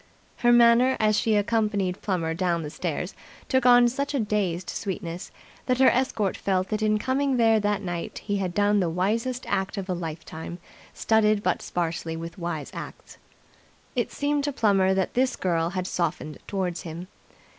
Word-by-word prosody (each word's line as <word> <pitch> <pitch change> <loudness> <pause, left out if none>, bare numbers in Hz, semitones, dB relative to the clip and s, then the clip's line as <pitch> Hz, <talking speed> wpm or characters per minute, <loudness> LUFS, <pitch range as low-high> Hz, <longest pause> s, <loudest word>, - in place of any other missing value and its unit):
Her 240 - +3
manner, 240 +2 +5
as 215 -1 +3
she 220 0 +2
accompanied 205 -3 0
Plummer 170 -5 -1
down 170 -1 0
the 150 - -6
stairs, 175 +3 -3 0.3
took 260 -1 +2
on 245 0 +7
such 280 +4 -2
a - - +1
dazed 200 -5 -1
sweetness 175 -3 -5 0.4
that 255 -1 +2
her 265 - +6
escort 225 -6 0
felt 190 -1 -1
that 215 0 -2
in 215 0 +2
coming 265 +3 0
there 225 -2 +4
that 205 -1 0
night 175 -2 -4
he 205 -1 -2
had 185 -3 -3
done 205 0 +3
the 180 -3 +1
wisest 225 +9 -1
act 195 +2 -1
of 195 -1 -4
a 185 - -1
lifetime 165 0 -6 0.3
studded 215 -2 +2
but 180 - 0
sparsely 165 -1 -3
with 165 +3 -7
wise 170 -4 -4
acts. - - -9 0.8
It - - -1
seemed 290 0 0
to 290 - 0
Plummer 195 -6 +3
that 190 -1 0
this 255 +1 +1
girl 170 -2 0
had 185 0 -3
softened 170 -4 -3
towards 185 -3 -2
him. 170 +2 -7
200 Hz, 175 wpm, -26 LUFS, 175-230 Hz, 0.8 s, on